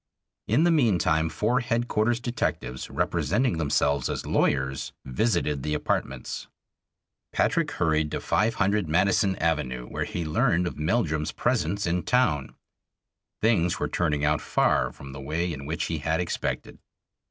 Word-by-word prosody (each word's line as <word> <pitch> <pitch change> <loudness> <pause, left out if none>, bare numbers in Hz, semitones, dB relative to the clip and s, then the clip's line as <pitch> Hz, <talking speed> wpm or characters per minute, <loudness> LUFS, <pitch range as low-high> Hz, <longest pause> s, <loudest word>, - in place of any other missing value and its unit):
In 155 - +3
the 175 - +4
meantime 90 - +2
four 115 +8 +1
Headquarters' 120 -1 0
detectives, 90 - -3
representing 125 -10 0
themselves 70 -2 +1
as - - -3
lawyers, 65 0 0
visited 75 - 0
the 75 +2 -1
apartments. 65 -3 -3 0.8
Patrick 165 -3 +1
hurried 80 - +1
to - - -3
500 105 -3 +1
Madison 95 +3 +3
Avenue, 75 -8 -1
where - - -3
he 85 - -4
learned 85 +3 +2
of 85 - -5
Meldrum's 80 -3 0
presence 95 +6 0
in 90 +1 0
town. 85 - +1 0.9
Things 95 -7 +2
were - - 0
turning 75 -4 0
out 75 0 +2
far - - +2
from 70 0 -11
the 65 0 -8
way 80 +5 -2
in 70 -1 -7
which 80 +1 -2
he 80 -2 -2
had 80 +3 0
expected. 90 - -3
80 Hz, 140 wpm, -26 LUFS, 75-105 Hz, 0.9 s, the